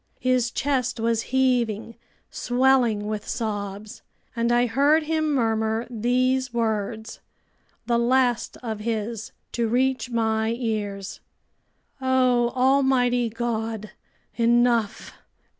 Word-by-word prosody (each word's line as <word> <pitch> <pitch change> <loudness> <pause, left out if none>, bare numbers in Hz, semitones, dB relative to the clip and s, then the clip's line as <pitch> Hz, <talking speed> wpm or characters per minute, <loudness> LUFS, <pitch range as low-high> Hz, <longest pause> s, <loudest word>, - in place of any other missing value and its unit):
His 255 -2 +1
chest 250 -2 -1
was 225 0 +1
heaving, 240 -4 0 0.4
swelling 245 -4 +2
with 210 0 -4
sobs. 205 -2 -4 0.3
And 235 0 0
I 240 +1 +3
heard 285 +6 +3
him 310 0 0
murmur 225 -3 0
these 255 +3 +1
words, 220 -1 -2 0.7
the 235 -1 +1
last 245 -1 +1
of 220 -3 -4
his 220 0 -3 0.2
to 235 -1 -1
reach 255 +2 0
my 220 -1 0
ears: 205 -5 -4 0.8
"O 255 -2 +2
almighty 255 -2 +2
God! 225 -2 -3 0.5
Enough! 235 -2 +2
235 Hz, 100 wpm, -24 LUFS, 220-255 Hz, 0.8 s, I